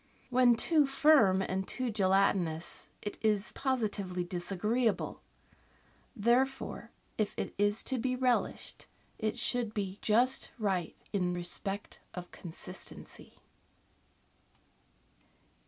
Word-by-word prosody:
When 245 -1 +5
too 300 +4 +4
firm 270 -10 +5
and 190 0 -2
too 255 -2 -1
gelatinous 190 -5 +1 0.2
it 205 - -5
is 210 -2 +1
positively 205 -9 -1
disagreeable; 200 +6 -1 0.9
therefore, 250 +4 +1 0.3
if 215 - 0
it - - -3
is 205 +1 +2
to 260 -2 -2
be 255 +2 0
relished, 250 -1 -1 0.3
it 215 0 -1
should 240 -3 0
be 195 -2 -3
just 245 +5 +2
right 190 -7 -1 0.2
in 180 -3 0
respect 195 +3 -3 0.2
of 180 -1 -7
consistency. 170 -3 -7
210 Hz, 100 wpm, -32 LUFS, 190-250 Hz, 0.9 s, When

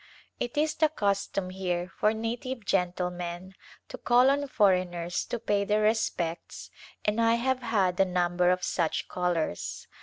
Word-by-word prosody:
It 240 +3 -4
is 305 +1 +2
the 315 -1 +2
custom 200 -6 -1
here 180 -1 -3
for 210 - +4
native 235 +2 -4
gentlemen 180 -1 -2 0.3
to - - -9
call 250 +2 +5
on 285 0 0
foreigners 180 -6 +1
to - - -3
pay 205 -3 0
their 210 +1 +1
respects 185 -6 -1 0.3
and 210 +2 +1
I 230 0 +4
have 260 +2 0
had 200 -6 +1
a - - +7
number 180 -1 +1
of 180 0 +1
such 165 -3 -1
callers. 175 - -2
195 Hz, 150 wpm, -28 LUFS, 180-230 Hz, 0.3 s, a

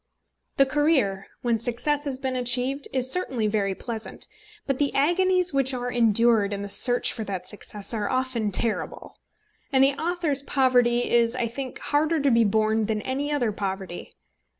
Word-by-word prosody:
The 275 - +6
career, 270 -10 +1 0.2
when 235 -2 +1
success 280 +6 -1
has 275 -2 -2
been 260 -1 -3
achieved, 250 +3 +1
is 260 -1 -2
certainly 265 -10 -1
very 205 -2 0
pleasant; 225 0 -7 0.4
but 275 -2 -2
the 285 -1 +1
agonies 365 +4 +2
which 270 -1 +1
are 245 0 -3
endured 230 -3 +3
in 200 0 -4
the 200 - -6
search 245 +4 +3
for 225 - -5
that 185 -2 -5
success 210 0 -7
are 210 -2 -2
often 255 -5 -1
terrible. 220 +3 -1 0.6
And 265 -1 +4
the 275 +1 +4
author's 320 -2 -1
poverty 245 -3 +2
is, 235 0 +2
I 250 - 0
think, 255 +3 -6
harder 310 +2 0
to 280 -1 +2
be 230 0 +4
borne 215 0 +1
than 215 -1 -2
any 280 +3 -2
other 250 -7 0
poverty. 190 -3 -5
245 Hz, 170 wpm, -25 LUFS, 220-275 Hz, 0.6 s, The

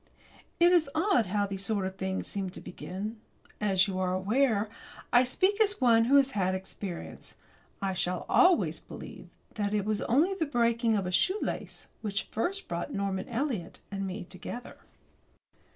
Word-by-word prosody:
It 345 +1 +6
is 340 -5 +4
odd 330 - +3
how 205 +2 +1
these 195 -1 -4
sort 200 -2 0
of 190 0 -4
things 190 0 -2
sometimes 190 -2 -3
do - - -8
begin. 205 +5 -6 0.4
As 195 -1 +3
you 190 -1 -3
are 185 0 0
aware, 215 +2 +2 0.5
I 245 +1 +7
speak 375 - +2
as 410 -2 +3
one 230 -3 +5
who 270 +4 +4
has 275 -1 +5
had 185 -4 0
experience. 190 -1 -6 0.5
I 195 -1 0
shall 180 0 -1
always 365 -2 +4
believe - - -10 0.2
that 205 -1 -1
it 205 -2 0
was 215 -1 0
only 305 +11 +3
the 330 -5 -1
breaking 235 -3 +2
of 195 -3 0
a 180 - -2
shoelace 375 - 0
which 205 -1 -2
first 385 - -2
brought - - -3
Norman 195 -4 -2
Eliot 235 - -2
and 195 -1 -3
me 190 +1 -5
together. 185 +7 -8
210 Hz, 170 wpm, -29 LUFS, 190-270 Hz, 0.5 s, I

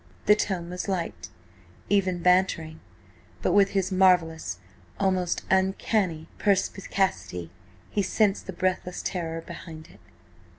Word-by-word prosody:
The 210 - +7
tone 180 -5 -2
was 180 +2 -4
light, 185 -4 -3 0.6
even 185 -3 +1
bantering, 180 -3 +2 0.6
but - - +2
with 200 -1 +5
his 190 0 0
marvellous, 170 - +3 0.4
almost 185 -3 +1
uncanny 190 -3 +1
perspicacity, 190 - 0 0.4
he 205 - +1
sensed 200 +2 +1
the - - -3
breathless 180 0 -2
terror 165 -2 -3
behind 165 -1 -10
it. - - -18
185 Hz, 115 wpm, -26 LUFS, 170-195 Hz, 0.6 s, The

